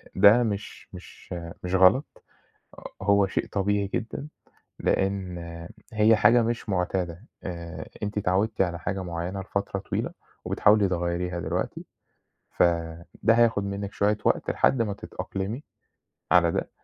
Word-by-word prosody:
ده 115 +4 +7
مش 105 -2 -4
مش - - -11 0.3
مش 90 +1 -1
غلط، 95 +9 +4 0.6
ه - - -11 0.2
هو 100 0 +4
شيء 95 - -2
طبيعي 100 0 0
جدًا، 120 +6 -3 0.5
لإن 95 -2 0 0.5
هي 110 +1 +5
حاجة 115 +3 +5
مش 115 0 -2
مُعتادة، 90 0 -1 0.2
آآ 85 -2 -6 0.2
أنتِ 105 0 -2
اتعوّدتِ 100 +3 0
على 85 -2 -1
حاجة 95 +3 -3
معيّنة 85 +3 -4
لفترة 100 +1 -3
طويلة - - -3 0.3
وبتحاولي 105 -1 +4
تغيّريها 90 0 -2
دلوقتي، 85 +3 -3 0.7
فده 85 +5 +1
هياخُد 115 -3 +3
منِّك 100 0 -4
شوية 105 +1 +1
وقت - - +1
لحد 130 -3 +3
ما 105 -3 -2
تتأقلمي 100 +6 -5 0.7
على 85 -2 +5
ده، - - -2
100 Hz, 130 wpm, -26 LUFS, 90-105 Hz, 0.7 s, ده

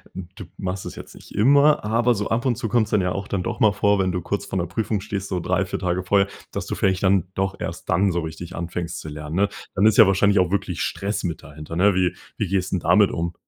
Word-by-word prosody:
d 95 - -5
du 105 - -8
machst 95 0 -4
das - - -7
jetzt - - -10
nicht - - -14
immer. 140 +6 +5
Aber 115 +3 +2
so 105 0 -3
ab 115 +4 0
und 125 -2 +2
zu 115 - -3
kommt's 110 -1 +2
dann 105 -2 +2
ja 90 0 0
auch 100 +2 -4
dann 95 -2 -2
doch - - -4
mal 110 - +5
vor, 100 0 +2
wenn 95 -1 +1
du 90 0 -2
kurz 100 +4 -3
vor 95 - -4
'ner 85 - 0
Prüfung 105 +3 -2
stehst, 100 0 -4
so 90 - -1
3, 95 +2 0
4 - - -4
Tage 90 0 -1
vorher, 100 +1 +3 0.2
dass - - -4
du - - -4
vielleicht 95 0 0
dann 95 -2 +3
doch 95 0 -2
erst - - -6
dann 95 +3 +3
so 85 0 -1
richtig 80 +3 -7
anfängst 85 0 -4
zu 80 - -7
lernen, 75 +1 -6
ne? 100 +2 +2 0.3
Dann 95 - +3
ist 110 -1 +5
ja 110 - +9
wahrscheinlich 100 +1 +3
auch 90 -1 +2
wirklich 95 -3 -2
Stress 100 +2 -2
mit 85 -4 -4
dahinter, 75 +1 -9
ne? 100 +4 +4
Wie 90 -1 +1 0.2
wie 105 - -1
gehst 95 0 -1
'n 95 - +1
damit 95 +5 +4
um? 85 0 -2
95 Hz, 270 wpm, -23 LUFS, 90-100 Hz, 0.3 s, ja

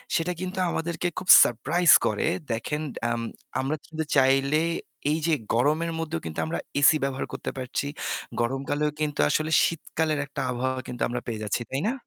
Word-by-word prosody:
সেটা 165 +2 0
কিন্তু 185 +1 -5
আমাদেরকে 170 +2 -2
খুব 185 - -5 0.2
সারপ্রাইজ 170 +9 +2
করে। - - 0 0.2
দেখেন 150 +7 -2 0.3
আম 120 0 -1 0.4
আমরা 135 +4 -1
চিন্তু 160 0 -4
চাইলে 135 +2 +3 0.5
এইযে 160 +1 +1 0.2
গরমের 155 +7 +1
মধ্যেও 165 0 -3
কিন্তু 80 0 -5
আমরা 85 +1 -3 0.2
এসি 145 +2 +6
ব্যবহার 135 -1 -2
করতে - - -4
পারছি। 130 +2 -3 0.5
গরমকালেও 140 +4 -1
কিন্তু 150 -1 -2
আসলে 155 +1 0
শীতকালের 160 -2 -1
একটা 140 -1 -6
আবহাওয়া 130 +1 -2
কিন্তু 125 - -7
আমরা 125 0 -3
পেয়ে 110 -2 -4
যাচ্ছি, 105 +3 -1
তাই 135 +2 -1
না? 240 - +1
145 Hz, 160 wpm, -26 LUFS, 130-160 Hz, 0.5 s, এসি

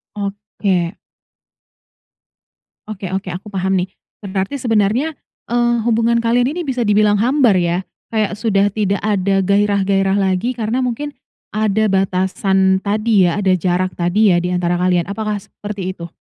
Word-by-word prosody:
Oke. 200 -3 -2 1.9
Oke 195 -4 -6
oke, 190 -1 -3
aku 190 +4 -8
paham 190 0 0
nih. 185 0 0 0.3
Berarti 195 +5 -2
sebenarnya, 230 +3 +1 0.4
eee, 240 0 +2
hubungan 230 0 +2
kalian 245 +4 +2
ini 355 - -2
bisa 255 -5 -1
dibilang 210 0 +3
hambar 245 -3 +3
ya? 175 +1 0 0.3
Kayak 215 -2 +1
sudah 205 -3 +2
tidak 200 -1 -1
ada 195 -2 +1
gairah-gairah 200 -1 +2
lagi 195 +5 0
karena 230 +2 -1
mungkin 255 +4 -2 0.4
ada 215 0 +1
batasan 190 0 +1
tadi 210 -1 +2
ya? 175 +4 -1
Ada 190 -2 +3
jarak 185 +1 0
tadi 185 +4 +3
ya 175 - +4
di 180 +1 -2
antara 175 0 0
kalian. 180 0 +1
Apakah 210 0 -2
seperti 200 -2 -6
itu? 170 -2 -9
200 Hz, 140 wpm, -18 LUFS, 190-220 Hz, 1.9 s, ya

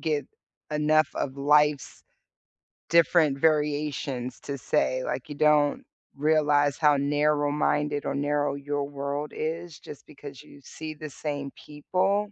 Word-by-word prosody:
get 150 -2 -1 0.4
enough 150 0 +3
of 130 -1 -3
life's 150 0 +2 0.9
different 165 -3 +4
variations, 150 -4 0
to 140 - -5
say. 130 +3 0
Like, 130 - -4
you 145 - -6
don't 150 -1 +3 0.3
realize 145 -1 +2
how 150 -3 +4
narrow-minded 145 0 +1
or - - -1
narrow 145 0 0
your 145 0 -3
world 140 +1 -4
is 165 0 -4
just 145 - -12
because 145 -1 -11
you 145 - -16
see 155 +3 -8
the 155 0 -8
same 145 -1 -5
people. 190 +7 -1
145 Hz, 125 wpm, -26 LUFS, 140-150 Hz, 0.9 s, different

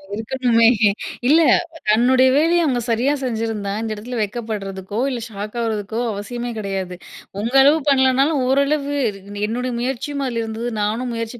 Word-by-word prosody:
இருக்கணுமே! 230 0 +2 0.6
இல்ல 315 +5 +6 0.5
தன்னுடைய 250 +4 +4
வேலைய 335 +3 +3
அவுங்க 255 -5 +1
சரியா 245 +6 +2
செஞ்சிருந்தா? 225 -4 -2
இந்த 225 -1 -3
இடத்தில 240 +4 -6
வெட்கப்படுறதுக்கோ 205 -2 -4
இல்ல, 250 - -3
ஷாக் 210 0 -7
ஆகுறதுக்கோ, 220 -1 -2
அவசியமே 240 +4 -5
கிடையாது. 195 -3 -4 0.4
உங்க 230 +4 -3
அளவு 290 +4 +5
பண்ணலனாலும் 270 +2 +3
ஓரளவு 280 +1 +1 0.5
என்னுடைய 250 +3 -2
முயற்சியும் 270 +3 -3
அதில 235 -2 -2
இருந்தது, 225 +2 -4
நானும் 230 +4 -1
முயற்சி 230 +1 -5
235 Hz, 130 wpm, -20 LUFS, 215-265 Hz, 0.6 s, இல்ல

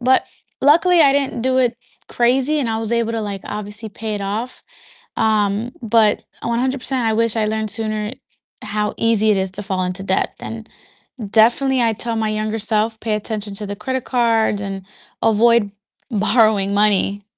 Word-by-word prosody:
But 260 +1 +3 0.3
luckily, 335 +5 +5
I 280 -3 +6
didn't 275 -4 -1
do 260 +1 +2
it 245 -2 +2 0.3
crazy, 260 +5 +2
and 250 - -1
I 220 - -1
was 225 0 -3
able 230 -1 0
to, 225 - -2
like, 200 -2 -5
obviously 210 +1 -6
pay 215 +1 -5
it 205 - -4
off, 215 +6 -4 0.5
um, 215 +1 +1
but 220 -2 +3 0.2
100%, 255 +1 -1
I 220 - +2
wish 230 0 +1
I 220 -1 +1
learned 220 0 -2
sooner 215 0 -3 0.5
how 210 0 -2
easy 220 -1 +2
it 210 - +3
is 190 -1 -1
to 205 - -5
fall 190 -2 -2
into 180 +1 -4
debt, 190 -1 -1
and 225 -1 -7 0.6
definitely 245 +5 +3
I'd 225 -3 0
tell 235 -1 -2
my 220 -1 0
younger 215 +1 -2
self, 220 +1 0
"Pay 220 -2 -2
attention 210 -1 -4
to 210 - -6
the 205 - -5
credit 260 +5 -3
cards, 230 -4 +1
and 195 -1 -5 0.4
avoid 225 -1 +3 0.4
borrowing 210 -2 +2
money 205 -1 +2
220 Hz, 175 wpm, -19 LUFS, 210-235 Hz, 0.6 s, I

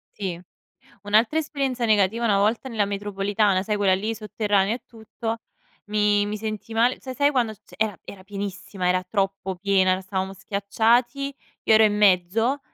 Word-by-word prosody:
Sì. 185 -4 -4 0.6
Un'altra 220 +9 +3
esperienza 275 -5 -2
negativa, 215 +1 +2
una 205 -3 +3
volta 215 +6 +1
nella 220 -4 0
metropolitana, 200 -1 0
sai 210 0 -1
quella 195 -2 +3
lì 215 +4 -2
sotterranea 210 -1 0
e 245 - -11
tutto, 225 0 -6 0.5
mi 210 0 +2
mi 210 +1 -3
sentii 215 +1 -5
male 240 +3 +2
cioè 260 -1 -7
sai 285 +1 +3
quando 240 -5 0
ci 215 - -23 0.2
era 215 -4 0
era 190 -2 -11
pienissima, 195 -1 -5
era 185 0 +2
troppo 195 0 -2
piena, 185 0 +2
stavamo 190 0 -3
schiacciati, 230 +8 0 0.3
io - - +4
ero 220 0 +7
in 210 -1 +3
mezzo 210 +7 +3
210 Hz, 160 wpm, -24 LUFS, 195-225 Hz, 0.6 s, ero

